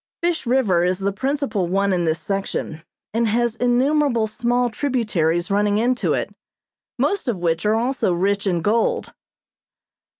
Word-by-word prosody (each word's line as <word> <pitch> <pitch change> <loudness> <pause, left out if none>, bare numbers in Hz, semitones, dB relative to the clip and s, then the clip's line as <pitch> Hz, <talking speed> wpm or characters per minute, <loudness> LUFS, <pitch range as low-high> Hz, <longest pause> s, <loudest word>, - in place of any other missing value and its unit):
Fish 340 -7 0
River 225 -9 +2
is 180 +1 +1
the 200 +1 -1
principal 260 - -1
one 195 +2 +1
in 175 -2 0
this 160 0 0
section, 195 -5 -3 0.3
and 230 +1 +1
has 235 +1 +1
innumerable 245 0 +2
small 240 +2 0
tributaries 210 - 0
running 205 +1 +2
into 245 +3 +1
it, - - -2 0.6
most 400 -7 0
of 235 -5 0
which 170 +2 0
are 215 - +3
also 245 -3 0
rich 200 +3 0
in 175 -3 0
gold. 225 +4 0
215 Hz, 145 wpm, -21 LUFS, 185-245 Hz, 0.6 s, are